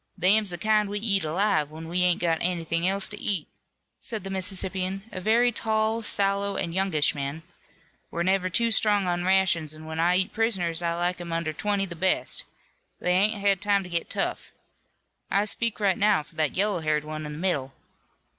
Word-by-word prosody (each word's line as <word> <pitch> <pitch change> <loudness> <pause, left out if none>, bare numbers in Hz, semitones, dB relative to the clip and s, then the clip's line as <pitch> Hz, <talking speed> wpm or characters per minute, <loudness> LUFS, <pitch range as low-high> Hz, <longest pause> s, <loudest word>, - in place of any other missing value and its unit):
"Them's 200 +3 +4
the 175 - -1
kind 215 +1 +2
we 205 - -2
eat 200 -3 +2
alive, 160 -1 +1
when 160 +1 -9
we 175 +2 -1
ain't 180 -1 +2
got 165 -2 +1
anything 170 -1 0
else 195 +1 +1
to 210 - -9
eat," 185 -7 +1 0.5
said 220 -5 -6
the 195 - -6
Mississippian, 190 0 -2
a 185 - -6
very 235 +5 +3
tall, 220 0 0
sallow 200 -1 0
and 165 - -3
youngish 185 -5 +2
man. 140 +3 -5 0.7
"We're 170 - -2
never 185 0 +1
too 230 +6 +1
strong 205 -2 +3
on 175 0 -1
rations, 180 -5 +2
and 155 0 -11
when 160 0 -5
I 175 +2 +3
eat 185 0 0
prisoners 185 -7 +1
I 170 -1 -1
like 175 +1 -1
'em 170 -1 -7
under 165 -1 -2
twenty 200 +3 -1
the 175 -3 -8
best. 190 - -1 0.5
They 180 - 0
ain't 205 +3 +2
had 200 -2 +2
time 200 -1 +2
to 180 - -10
get 170 -1 -2
tough. - - -3 0.8
I 200 +1 +2
speak 230 +1 +1
right 195 -3 +1
now 205 -7 +3
for - - -19
that 155 0 -1
yellow 200 -1 +2
haired 155 -1 0
one 155 0 -5
in 150 - -6
the - - -7
middle." 145 -7 -2
185 Hz, 200 wpm, -26 LUFS, 165-205 Hz, 0.8 s, Them's